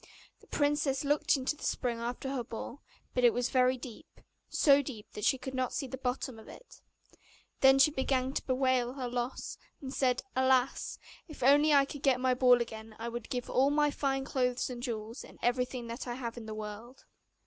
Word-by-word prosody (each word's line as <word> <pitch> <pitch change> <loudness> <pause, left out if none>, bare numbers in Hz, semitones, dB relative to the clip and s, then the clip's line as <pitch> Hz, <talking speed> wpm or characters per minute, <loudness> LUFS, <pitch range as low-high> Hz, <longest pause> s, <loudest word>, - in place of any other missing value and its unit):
The - - -21
princess 290 -2 +1
looked 290 +2 +3
into 265 +2 -1
the - - -13
spring 240 -2 -1
after 245 +3 -4
her 255 -3 -2
ball, 235 +4 -7 0.3
but 250 - 0
it 240 - +6
was 245 0 0
very 255 -1 +3
deep, 245 -2 -11 0.3
so 285 -1 +5
deep 245 -6 -8
that 210 - -4
she 265 - +3
could 260 +1 -7
not 255 -1 -1
see 285 - -2
the 265 - -6
bottom 250 -2 -3
of 220 - -14
it. - - -14 0.8
Then 270 0 +7
she 270 +3 +6
began 265 -2 0
to - - -3
bewail 255 -2 +1
her 260 -2 -4
loss, 245 +1 -4 0.2
and 265 -1 -7
said, 255 -2 +1
'Alas! 260 0 +2 0.3
if 310 -6 -8
I 260 - +6
could - - +9 0.3
only 285 - -8
get 265 -2 +2
my 255 0 +2
ball 250 -1 +5
again, 220 -1 -10
I 230 +1 -4
would 240 -1 -6
give 245 -1 -3
all 265 +2 +3
my 295 0 +2
fine 270 -2 -1
clothes 255 -2 0
and 240 -1 -6
jewels, 230 -1 -5
and - - -14
everything 250 0 0
that 235 +3 -6
I 240 - -3
have 235 -3 -5
in 230 -2 -8
the 215 - -5
world. 215 +4 -8
255 Hz, 205 wpm, -31 LUFS, 240-270 Hz, 0.8 s, could